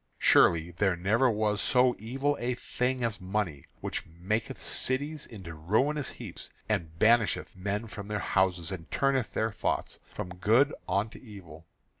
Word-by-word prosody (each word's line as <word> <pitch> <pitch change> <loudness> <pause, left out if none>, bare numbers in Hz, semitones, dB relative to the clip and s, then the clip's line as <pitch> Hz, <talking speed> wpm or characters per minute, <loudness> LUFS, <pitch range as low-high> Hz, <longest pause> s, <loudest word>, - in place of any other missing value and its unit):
Surely 85 0 +5
there 95 +1 +1
never 110 +9 +3
was 105 -2 +1
so 125 -1 +4
evil 135 +7 -1
a 120 +1 -1
thing 125 +1 -1
as 115 -3 -1
money, 95 -6 -2 0.2
which - - -3
maketh 105 +10 -3
cities 145 +4 -2
into 95 -7 -9
ruinous 125 - +1
heaps, - - -8 0.2
and 80 -1 -2
banisheth 110 0 +3
men 100 +4 -2
from 105 -3 -8
their 105 0 -2
houses, 95 -4 +1
and 80 -5 -7
turneth 135 -3 +1
their 110 0 +1
thoughts 100 - -2
from - - -5
good 115 +10 +4 0.2
unto 100 +5 -1
evil. 85 -9 -12
105 Hz, 150 wpm, -29 LUFS, 90-125 Hz, 0.2 s, Surely